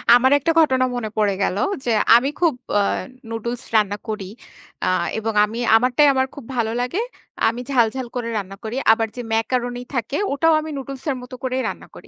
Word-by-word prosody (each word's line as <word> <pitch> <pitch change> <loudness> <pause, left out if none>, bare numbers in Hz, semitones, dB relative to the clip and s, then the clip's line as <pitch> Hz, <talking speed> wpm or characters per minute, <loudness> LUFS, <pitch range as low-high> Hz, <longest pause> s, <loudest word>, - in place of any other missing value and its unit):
আমার 260 +2 +4
একটা 330 +4 +1
ঘটনা 260 -5 +4
মনে 220 -3 -3
পড়ে 205 -2 +2
গেল 190 - 0 0.3
যে - - 0 0.3
আমি 250 +4 +4
খুব 335 -4 +4 0.3
আ - - +3 0.5
নুডলস 235 +2 -4
রান্না 205 -1 +2
করি। 210 -3 -3 0.6
আ - - 0 0.3
এবং 225 0 -2
আমি 225 +3 -6 0.2
আমারটাই 250 +5 +4
আমার 260 0 +1
খুব 280 -5 -9
ভালো 225 -1 +1
লাগে। 250 - -1 0.5
আমি 235 +2 -1
ঝাল-ঝাল 245 0 +1
করে 240 -2 -2
রান্না 195 -1 -5
করি। 220 +2 -4 0.2
আবার 225 0 0
যে - - -3
ম্যাকারোনি 245 +2 -1
থাকে 240 +4 -1 0.2
ওটাও 325 +3 +3
আমি 315 - -6
নুডলস 270 -1 -7
এর 270 - 0
মত 250 +1 -12
করেই 260 0 -1
রান্না - - -8
করি। - - -13
245 Hz, 190 wpm, -21 LUFS, 225-260 Hz, 0.6 s, আমার